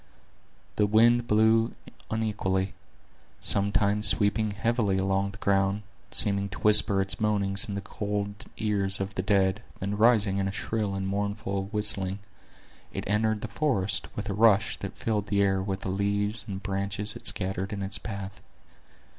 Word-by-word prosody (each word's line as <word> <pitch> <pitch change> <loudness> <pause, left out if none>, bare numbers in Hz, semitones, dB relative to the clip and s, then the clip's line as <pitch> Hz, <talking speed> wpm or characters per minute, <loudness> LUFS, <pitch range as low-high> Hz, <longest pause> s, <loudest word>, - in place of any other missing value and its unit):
The 105 - +3
wind 120 +3 +4
blew 110 +1 +3 0.3
unequally; 100 -3 -1 0.7
sometimes 100 +1 +2
sweeping 105 +1 +2
heavily 105 -1 0
along 95 +1 0
the 100 - -11
ground, 100 +1 +1 0.3
seeming 100 -1 +3
to 85 -3 -8
whisper 105 -2 +4
its 95 - -2
moanings 100 0 +2
in 100 - -3
the 100 - -3
cold 100 0 -4
ears 100 -2 0
of 95 0 -3
the 95 - -2
dead, 100 0 +1 0.2
then 100 +1 -2
rising 105 -3 +3
in 95 - 0
a - - -2
shrill 105 0 -2
and 95 0 -3
mournful 100 0 -2
whistling, 100 -2 0 0.7
it - - -5
entered 105 +1 0
the - - -4
forest 110 -11 -1
with 105 - -4
a 100 - -2
rush 110 0 +3
that 100 - -6
filled 105 -3 -1
the 100 -1 +2
air 95 -1 +1
with 95 0 -3
the - - -4
leaves 100 +3 -1
and 95 -1 -6
branches 100 +1 -1
it - - -2
scattered 95 0 0
in 100 -1 -4
its 95 0 -2
path. 100 -2 -7
100 Hz, 160 wpm, -27 LUFS, 95-105 Hz, 0.7 s, wind